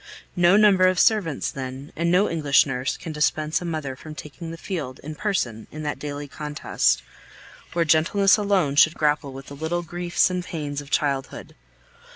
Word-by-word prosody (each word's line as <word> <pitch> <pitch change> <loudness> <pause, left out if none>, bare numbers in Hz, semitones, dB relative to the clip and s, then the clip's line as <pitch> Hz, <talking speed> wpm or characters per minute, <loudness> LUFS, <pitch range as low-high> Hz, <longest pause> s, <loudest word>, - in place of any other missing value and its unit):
No 175 +2 +5
number 200 -3 +5
of 185 -2 +1
servants, 195 -10 +2
then, 135 +1 -7
and 170 +1 0
no 185 +4 +4
English 145 -4 +3
nurse 130 -2 -2
can 165 - -7
dispense 155 +1 0
a - - -5
mother 155 -5 -3
from 155 +3 -10
taking 160 +3 -8
the 165 - -7
field 155 -8 -5
in 155 +2 -6
person 140 - -2
in 155 0 -8
that 150 - -3
daily 145 0 -5
contest, 135 - -1 0.7
where 170 0 +1
gentleness 170 +6 +4
alone 195 -9 +1
should 155 +2 +6
grapple 150 -2 0
with 135 0 -9
the 140 - -10
little 160 +4 -2
griefs 175 +1 0
and 180 -1 -2
pains 145 -5 -4
of 140 - -13
childhood. 140 -3 -2
155 Hz, 180 wpm, -24 LUFS, 140-175 Hz, 0.7 s, should